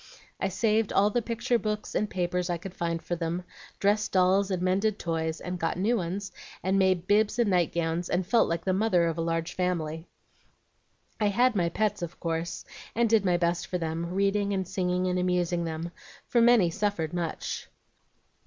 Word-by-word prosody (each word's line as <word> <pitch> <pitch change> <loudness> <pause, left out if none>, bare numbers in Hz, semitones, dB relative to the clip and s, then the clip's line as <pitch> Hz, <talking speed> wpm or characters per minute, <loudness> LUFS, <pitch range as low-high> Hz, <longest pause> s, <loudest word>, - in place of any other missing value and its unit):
I - - +1
saved 215 +2 +1
all 205 +2 +3
the 240 - +1
picture 235 +1 0
books 210 -1 -3
and 210 - 0
papers 180 0 -1
I 175 - 0
could 180 +2 -8
find 170 -2 -2
for 175 - -2
them, 170 +1 -3 0.4
dressed 210 +2 +2
dolls, 190 +1 +3
and 185 -2 -1
mended 195 +4 +1
toys, 160 -1 -2
and 180 0 -5
got 165 +1 -1
new 215 +6 +2
ones, 190 0 -3 0.3
and 190 +1 +2
made 185 -2 +2
bibs 210 +3 +2
and 235 -4 +2
night 175 -3 +2
gowns, 170 +1 -1
and 180 +1 0
felt 230 +6 +3
like 170 0 -2
the 190 - +2
mother 190 -3 +3
of 165 0 -1
a - - +1
large 165 +1 -1
family. 165 -3 -2 1.1
"I 210 - +3
had 240 +4 +3
my 175 -3 +2
pets, 215 +2 -1
of 175 -1 -6
course, 165 0 -3 0.3
and 235 +1 +3
did 220 -3 +5
my 180 -2 +2
best 170 0 0
for 180 - -2
them, 165 0 -3
reading 200 +2 +1
and 190 -2 -1
singing 180 -1 0
and 180 0 0
amusing 180 -1 0
them, 165 +1 -4 0.3
for 240 - +2
many 230 -7 +5
suffered 180 -4 -1
very 175 -1 0
much. 165 - -5
180 Hz, 195 wpm, -28 LUFS, 170-205 Hz, 1.1 s, did